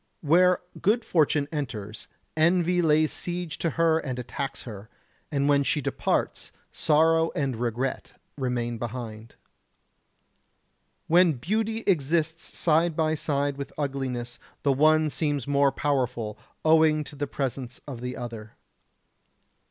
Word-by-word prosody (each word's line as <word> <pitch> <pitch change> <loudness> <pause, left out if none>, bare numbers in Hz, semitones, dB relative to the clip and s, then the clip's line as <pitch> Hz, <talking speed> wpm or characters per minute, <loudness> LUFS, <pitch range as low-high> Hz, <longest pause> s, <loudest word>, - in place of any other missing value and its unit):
Where 180 +4 +4 0.2
good 220 +4 +2
fortune 150 -3 +2
enters, 115 -9 -5 0.3
envy 175 +2 +3
lays 155 -1 +3
siege 175 -2 -4
to 165 - 0
her 165 -1 +4
and 130 -5 -4
attacks 135 +3 -5
her, 110 -2 -9 0.4
and 140 -1 +1
when 145 -1 +4
she 140 - 0
departs 140 - -1 0.2
sorrow 160 +1 +3
and 135 -4 -1
regret 120 +3 -3 0.2
remain 120 -3 -2
behind. 115 -2 -6 1.7
When 175 0 +5
beauty 220 - -1
exists 160 -1 0
side 165 0 +2
by 155 -1 +1
side 145 -2 -1
with 140 - -6
ugliness, 130 -4 -3 0.2
the 140 - +3
one 155 +2 +4
seems 145 -4 -1
more 140 -1 +3
powerful, 125 -6 -1 0.3
owing 155 -1 +5
to 150 - -10
the 145 0 -3
presence 130 -3 -4
of 130 -5 -7
the 125 0 -4
other. 115 -3 -7
145 Hz, 125 wpm, -26 LUFS, 125-160 Hz, 1.7 s, When